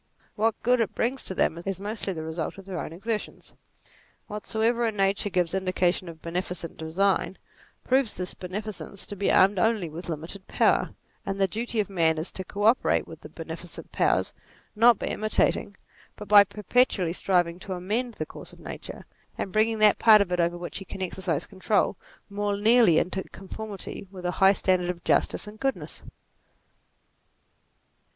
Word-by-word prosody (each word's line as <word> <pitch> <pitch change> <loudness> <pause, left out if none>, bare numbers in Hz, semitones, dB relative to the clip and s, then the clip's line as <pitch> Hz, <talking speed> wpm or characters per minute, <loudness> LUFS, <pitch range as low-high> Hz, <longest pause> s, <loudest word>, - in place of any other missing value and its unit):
What 220 +1 +1
good 250 +1 +3
it 225 - -1
brings 255 +3 -1
to 190 - -5
them, 165 -1 +1
is 195 -1 -3
mostly 205 0 -3
the 160 -4 -5
result 160 +2 -4
of 195 - -11
their 190 -3 -5
own - - -5
exertions. 210 +6 -4 0.7
Whatsoever, 225 +3 0
in 220 - -2
nature, 195 +1 +1
gives 180 -3 0
indica 185 -2 +2
tion 180 -1 -6
of 160 -1 -12
beneficent 175 0 -4
design, 185 +3 0 0.5
proves 260 -3 +1
this 180 -1 -4
beneficence 200 +1 -6
to 205 - -6
be 200 0 +1
armed 195 0 +5
only 205 -5 +1
with 170 +3 -8
limited 165 +5 -6
power; - - +2 0.3
and 195 0 -4
the 195 - +3
duty 225 +3 -3
of 205 - +1
man 165 -4 +2
is 160 +3 -3
to 190 - -4
co 200 +3 -5
operate 225 +4 +3
with - - -10
the - - -11
beneficent - - -9
powers, - - +1 0.4
not 230 +1 +6
by - - -4
imitating 210 -2 0 0.4
but 210 - -9
by 205 0 +9
perpetually 205 -4 +1
striving 175 -2 +1
to 190 - -5
amend 215 +7 -2
the 155 - -3
course - - -11
of - - -16
nature - - -8 0.3
and 195 - -3
bringing 220 +1 +2
that 215 -2 +5
part 220 -2 +8
of 200 -3 0
it 180 - 0
over 170 0 +1
which 175 +2 -6
we 195 - -9
can 190 - -5
exercise 175 -4 -2
control, 190 -2 0 0.3
more 205 0 -2
nearly 220 -5 +5
into 190 +2 0
conformity 200 0 -8
with 185 -2 -10
a 175 - +1
high 195 +1 +7
standard 185 -2 +1
of 175 -1 -4
justice - - +1
and 210 +1 -11
goodness. 270 0 -3
195 Hz, 175 wpm, -26 LUFS, 180-215 Hz, 0.7 s, by